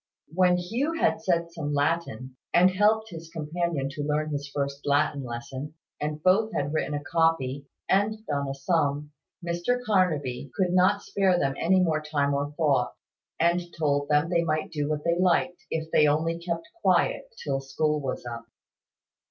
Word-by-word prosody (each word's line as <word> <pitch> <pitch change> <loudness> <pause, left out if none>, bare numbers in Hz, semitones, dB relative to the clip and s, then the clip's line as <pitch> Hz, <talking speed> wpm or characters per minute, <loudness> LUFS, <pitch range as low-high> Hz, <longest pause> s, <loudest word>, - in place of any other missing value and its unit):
When 180 0 +4
Hugh 235 - -1
had 330 - +1
said 170 -2 0
some 150 -3 -3
Latin, 140 -4 -1 0.2
and 180 +2 +6
helped 215 +3 +2
his 165 -1 -9
companion 165 -2 -2
to 145 0 -5
learn 150 +1 -1
his 140 -1 -4
first 140 0 -3
Latin 145 0 +1
lesson, 130 +5 -6 0.3
and 150 0 -3
both 210 +4 +4
had 145 +1 -1
written 150 -2 -1
a 145 - -4
copy, 145 -4 0 0.2
and 215 +3 +1
done 140 -2 -1
a 135 - -3
sum, 145 0 0 0.3
Mr 175 +8 0
Carnaby 155 - 0
could 185 -2 +1
not 185 +3 +3
spare 190 -2 +2
them 135 -5 +1
any 185 +3 +3
more 160 -3 +1
time 145 -2 0
or 140 +1 -1
thought, 145 -5 +1 0.4
and 170 +2 +3 0.2
told 145 -2 0
them 150 +3 +2
they 170 -1 +3
might 155 0 -1
do 150 -2 -2
what 150 -1 -2
they 170 +1 +1
liked, 180 0 +1
if 160 0 -3
they 150 - +5
only 160 +3 +1
kept 170 -1 -4
quiet, - - +2 0.2
till 135 -1 -1
school 150 +3 -1
was 130 -2 -4
up. 115 -1 -7
155 Hz, 170 wpm, -27 LUFS, 145-175 Hz, 0.4 s, and